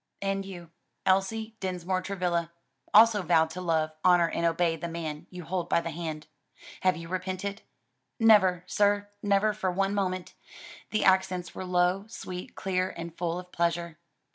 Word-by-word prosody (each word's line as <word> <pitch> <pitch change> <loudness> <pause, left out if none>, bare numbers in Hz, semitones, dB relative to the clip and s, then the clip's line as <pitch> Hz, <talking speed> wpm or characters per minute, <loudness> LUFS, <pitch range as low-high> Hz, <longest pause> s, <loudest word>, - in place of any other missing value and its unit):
"And 195 0 -1
you, 175 -3 -9 0.3
Elsie 220 +4 +1
Dinsmore 185 0 -2
Travilla, 180 -3 -1 0.4
also 215 -1 +7
vowed 160 -2 +3
to 180 +3 -6
love, 160 -3 +1
honor 175 -2 +5
and 170 0 0
obey 165 0 +1
the 170 +1 -5
man 160 -3 -5
you 180 -1 -8
hold 175 +1 -3
by - - +4
the 170 0 -4
hand. 155 -2 -5 0.5
Have 185 -1 +2
you 165 0 -8
repented?" 185 +2 -4 0.6
"Never, 195 -6 +5
sir; 205 +1 +1
never 205 +1 +2
for 210 -3 -1
one 195 +2 0
moment." 185 -2 -2 0.6
The 215 - 0
accents 185 -2 +2
were 185 - -6
low, 180 +2 +2
sweet, 185 -5 -7
clear, 185 -1 -1
and 170 -1 -7
full 170 -1 -2
of 180 0 -9
pleasure. 170 -1 -1
180 Hz, 160 wpm, -28 LUFS, 170-195 Hz, 0.6 s, also